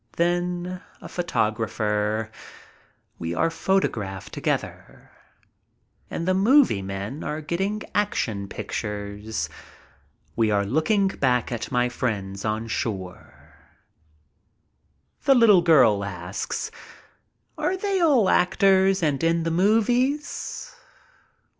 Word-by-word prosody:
Then 175 +1 -1 0.2
a - - -10
photographer. 110 -7 -1 0.9
We 85 +1 -3
are 165 0 +1
photographed 110 - -1
together. - - -4 1.0
And 170 - -4
the 185 - +3
movie 210 - +4
men 100 +8 -5
are 150 - -3
getting 195 +7 -2
action 115 - -1
pictures. 105 +1 -4 0.9
We 115 -2 +2
are 100 -1 +1
looking 160 - +2
back 125 -10 0
at 120 - -4
my 125 -1 +2
friends 100 -6 -3
on 110 +1 -1
shore. 95 -5 -5 1.7
The 275 - +6
little 215 -7 +6
girl 125 -12 +5
asks: 90 0 -4 0.8
"Are 375 - -1
they 390 0 0
all 275 - +4
actors 190 0 +3
and 145 -1 0
in 165 0 +2
the 165 - -1
movies? 240 - 0
155 Hz, 100 wpm, -24 LUFS, -, 1.7 s, The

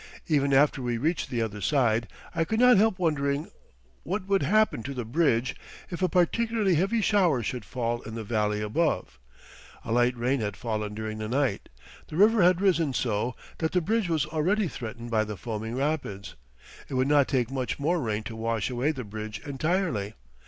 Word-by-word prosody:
Even 140 -3 +2
after 140 0 +4
we 120 -1 -1
reached 155 +6 -1
the 120 -3 0
other 105 -2 -5
side 115 -1 +2 0.3
I 165 - +1
could 220 +7 -1
not 250 -2 +7
help 215 -1 +3
wondering 145 -4 0 0.5
what 190 +2 -3
would 195 0 +2
happen 215 - +2
to 140 +3 -6
the 125 -2 -3
"bridge" 125 -2 +1 0.4
if 175 - -5
a 185 - +2
particularly 215 +2 +2
heavy 195 +8 +1
shower 180 - +3
should 120 +2 -3
fall 120 -1 -2
in 110 +1 -8
the 115 - -4
valley 105 -1 0
above. 105 - -1 0.7
A - - -4
light 120 +1 +2
rain 125 +3 +1
had 105 -2 -3
fallen 105 -3 -3
during 110 0 -5
the 110 0 -4
night. 130 -4 0 0.4
The - - -8
river 215 +2 +5
had 180 +1 +4
risen 165 -8 +2
so 115 +1 -1 0.2
that 160 -1 -1
the 180 - +3
bridge 215 +1 0
was 155 -3 +1
already 175 +7 +1
threatened 120 -3 -7
by 110 -1 +3
the 105 -1 -6
foaming 110 +1 -4
rapids. 135 -8 -2 0.6
It - - -4
would 130 +1 +2
not 145 -2 +4
take 125 -2 0
much 130 -4 -2
more 165 +5 +1
rain 110 -3 -2
to 110 - -7
wash 115 0 -1
away 125 +5 +1
the 130 -4 -5
bridge 105 0 -6
entirely. 140 - -1
135 Hz, 190 wpm, -27 LUFS, 115-170 Hz, 0.7 s, not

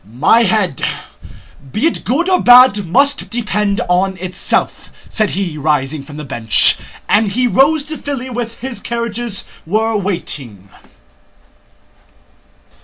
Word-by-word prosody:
"My 125 - +2
head, 205 - 0 0.9
be 215 - -1
it 330 - -1
good 295 - 0
or 370 -1 +2
bad, 245 -6 +6
must 280 - +1
depend 210 -2 -1
on 185 +2 0
itself," 185 0 -3 0.2
said 215 -3 0
he, 175 -6 -3
rising 150 -1 -1
from 145 +2 -12
the 150 - -7
bench, 120 -5 +5 0.3
and 210 -1 +2
he 250 +3 +1
rode 280 +6 +3
to 310 +2 -8
Filí 260 -3 -5
where 240 -1 -3
his 235 +2 -8
carriages 235 -2 -4 0.2
were 220 +6 -1
waiting. 145 - -5
210 Hz, 125 wpm, -15 LUFS, 170-245 Hz, 0.9 s, bad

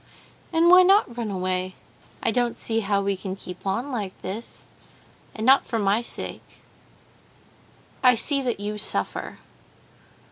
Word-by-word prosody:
"And 330 0 +3
why 365 +1 +9
not 375 - +4
run 235 -3 -3
away? 185 -1 -2 0.5
I - - +2
don't 240 +1 0
see 225 0 0
how 200 -2 0
we 200 0 0
can 190 0 -6
keep 180 0 -9
on 235 +9 -2
like 205 -6 -4
this. 205 +5 -7 0.7
And 220 - -4
not 270 +2 +6
for 230 - -3
my 205 +1 +2 2.0
sake—I 250 -1 +6
see 275 +4 +3
that 245 -5 -2
you 210 +1 -4
suffer." 100 - -3
220 Hz, 140 wpm, -24 LUFS, 195-250 Hz, 2.0 s, why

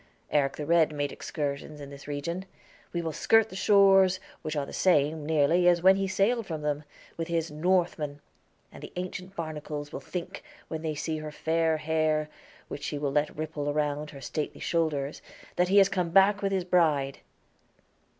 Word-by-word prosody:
Eric 140 -2 +2
the 150 - -5
Red 165 0 +4
made 145 -1 -2
excursions 150 -2 -4
in 140 -1 -9
this 140 0 -11
region. 170 +6 -4 0.5
We 170 -1 -2
will 160 - -2
skirt 225 +7 +3
the 185 - -10
shores, 195 -1 +5 0.2
which 155 -1 -4
are 145 -1 -1
the - - -10
same, 150 -3 +2
nearly, 160 +3 +3
as 175 -1 +4
when 190 +1 +7
he 195 0 -1
sailed 200 +4 +1
from 155 -3 -4
them, 150 0 -2 0.3
with 165 -1 -3
his 165 -1 -1
Northmen; 155 -3 0 0.5
and - - -12
the - - -9
ancient 185 +1 -6
barnacles 150 -3 -5
will - - -4
think, 180 -2 -6 0.3
when 160 -1 -4
they 155 -1 -2
see 155 +1 -3
her 155 0 -6
fair 160 +1 +1
hair, 155 -1 0 0.4
which 145 - -7
she 150 - -3
will 145 -1 -1
let 150 +1 0
ripple 155 -2 -3
around 150 0 -1
her 140 -2 -11
stately 150 +3 -4
shoulders, 150 -4 -1 0.3
that 180 0 +2
he 200 - +4
has 195 -1 +8
come 180 -3 -1
back 195 +3 +5
with 195 -1 0
his 190 -2 0
bride." 150 -7 +2
160 Hz, 185 wpm, -28 LUFS, 150-180 Hz, 0.5 s, has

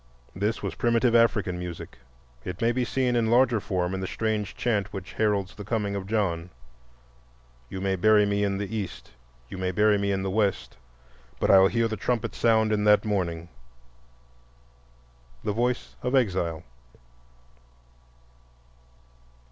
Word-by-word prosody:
This 105 +5 -2
was - - -3
primitive 115 0 +2
African 110 -6 +2
music; 90 -7 -8 0.4
it 90 +1 -6
may 115 +1 +2
be 125 +1 0
seen 125 0 0
in 115 -2 +1
larger 120 -1 +4
form 90 -2 -2
in 95 - -2
the 95 - -3
strange 110 -1 -2
chant 105 -5 -1
which 95 -2 -7
heralds 100 -3 0
"The 105 - -9
Coming 105 -1 -2
of 95 -1 -5
John": 90 -5 -1 1.2
"You 95 - -6
may 95 0 0
bury 105 +2 +4
me 100 0 0
in 100 -1 0
the 100 +2 -4
East, 100 -4 -6 0.4
You 95 - -8
may 95 0 -1
bury 105 +2 +3
me 100 0 0
in 95 -1 -1
the 95 - -2
West, 100 -2 -1 0.6
But - - +2
I'll 95 0 +7
hear 115 +2 +1
the 110 -1 -4
trumpet 115 +2 -1
sound 110 -2 +2
in 105 -1 0
that 105 +1 +5
morning," 85 -5 -2 2.0
—the 105 - -1
voice 120 +3 -1
of 125 +2 0
exile. 90 -9 0
105 Hz, 150 wpm, -26 LUFS, 95-115 Hz, 2.0 s, I'll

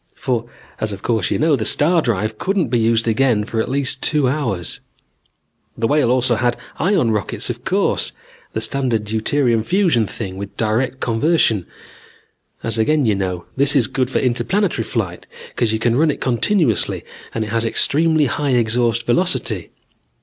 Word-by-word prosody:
For, 125 -6 -2 0.3
as 110 -1 -2
of 95 - -9
course 110 -6 0
you - - 0
know, 155 -1 +3
the 115 - -2
star 165 +8 +3
drive 110 -3 -2
couldn't 190 - 0
be 120 0 +1
used 115 0 +2
again 115 -1 +2
for 110 +1 -2
at - - -4
least 135 0 0
two 150 -4 +2
hours. 120 - -2 1.0
"The 115 - -1
Whale 145 -1 +2
also 125 -1 +2
had 120 0 0 0.2
ion 170 - +2
rockets 105 -3 -2
of - - -9
course, - - 0 0.4
the 110 - -2
standard 120 -2 0
deuterium 115 +2 +1
fusion 170 - +2
thing 95 -4 -6
with 100 0 -8
direct 120 +4 -1
conversion. 115 - +1 1.0
As 115 0 -1
again 150 +5 +2
you 110 - +3
know, 90 -3 -3
this 140 +2 +2
is 130 -5 +4
good 130 +3 -1
for - - -1
interplanetary 135 - 0
flight 95 -8 -3 0.2
because 115 -3 -1
you 110 - 0
can 115 +1 +1
run 155 +4 +3
it 145 - -2
continuously 130 - 0 0.3
and 115 - 0
it 105 - -7
has 115 0 +1
extremely 155 +6 +3
high 135 +1 0
exhaust 120 0 +1
velocity. 180 +9 0
120 Hz, 170 wpm, -19 LUFS, 110-145 Hz, 1.0 s, is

